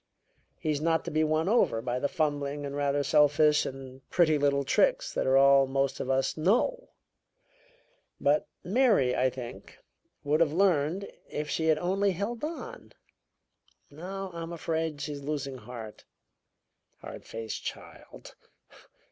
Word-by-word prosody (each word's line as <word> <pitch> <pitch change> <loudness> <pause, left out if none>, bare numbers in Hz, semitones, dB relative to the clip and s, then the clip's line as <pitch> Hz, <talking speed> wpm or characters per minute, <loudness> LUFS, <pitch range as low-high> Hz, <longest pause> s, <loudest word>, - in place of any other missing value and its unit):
He's 150 -2 -2
not 165 0 +1
to - - -4
be 155 +1 +2
won 155 +2 +1
over 210 - +3
by 120 +2 -2
the 145 - 0
fumbling 145 -3 -2
and 140 0 -5
rather 145 0 0
selfish 150 +1 +4
and 130 0 -9
pretty 165 -4 +3
little 140 0 +2
tricks - - +1
that - - -1
are 130 0 +4
all 135 0 +6
most 135 0 -1
of - - -4
us 135 0 +1
know. 245 - +1 1.3
But 145 +2 +2 0.2
Mary, 200 - +3
I 130 +1 +2
think, 120 -2 -9 0.5
would 150 +2 +1
have 160 -3 +2
learned 180 0 +1 0.2
if 150 0 -4
she 160 - 0
had 155 -1 +4
only 195 +4 +1
held 215 - -4
on. 320 +2 -7 1.0
Now, 190 +5 -6
I'm 165 0 -6
afraid, 160 -2 -3
she's 145 -1 -5
losing 140 -2 -4
heart. 110 -2 -9 1.0
Hard - - -9
faced 110 -1 -6
child!" - - -9
150 Hz, 140 wpm, -28 LUFS, 140-170 Hz, 1.3 s, all